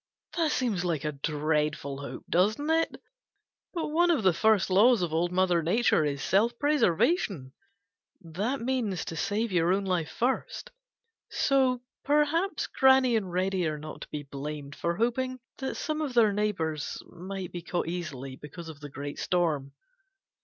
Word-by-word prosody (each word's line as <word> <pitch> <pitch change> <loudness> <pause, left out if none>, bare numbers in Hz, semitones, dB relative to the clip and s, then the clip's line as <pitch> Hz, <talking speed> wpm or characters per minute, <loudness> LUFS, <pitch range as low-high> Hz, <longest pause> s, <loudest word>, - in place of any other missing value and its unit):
That 325 -3 +1
seems 225 -11 0
like 165 -4 -1
a 150 - 0
dreadful 150 -1 -1
hope, 140 - -7
doesn't 215 - +2
it? 325 0 +1 0.7
But 335 -4 -3
one 345 +3 +3
of 315 -10 +2
the 185 -2 +5
first 205 +2 +3
laws 215 +2 +5
of 165 -3 -2
Old 170 +2 +1
Mother 180 -2 +2
Nature 180 +1 +3
is 140 -1 -2
self 230 +5 +2
preservation. 225 - +1 0.7
That 205 - -3
means 235 -7 -1
to 165 - -5
save 205 +7 -1
your 175 -1 +2
own 195 +1 +1
life 180 -4 0
first. 385 - -2 0.6
So 260 -3 +2 0.2
perhaps 300 +6 +1
Granny 265 -2 +4
and 195 -5 -1
Reddy 185 -1 0
are 155 -1 -2
not 155 +1 -9
to - - -7
be 150 -1 -5
blamed 140 +1 -6
for 170 0 -1
hoping 255 +4 -1 0.2
that 265 - -3
some 310 0 -2
of 280 -5 -3
their 220 -4 +5
neighbors 170 -8 -2
might 185 +1 -7
be 175 - -5
caught 175 0 -2
easily 140 -7 -5
because 160 +4 -9
of 155 -3 -10
the 145 -1 -8
great 140 +1 -6
storm. 155 -6 0
185 Hz, 160 wpm, -28 LUFS, 160-250 Hz, 0.7 s, the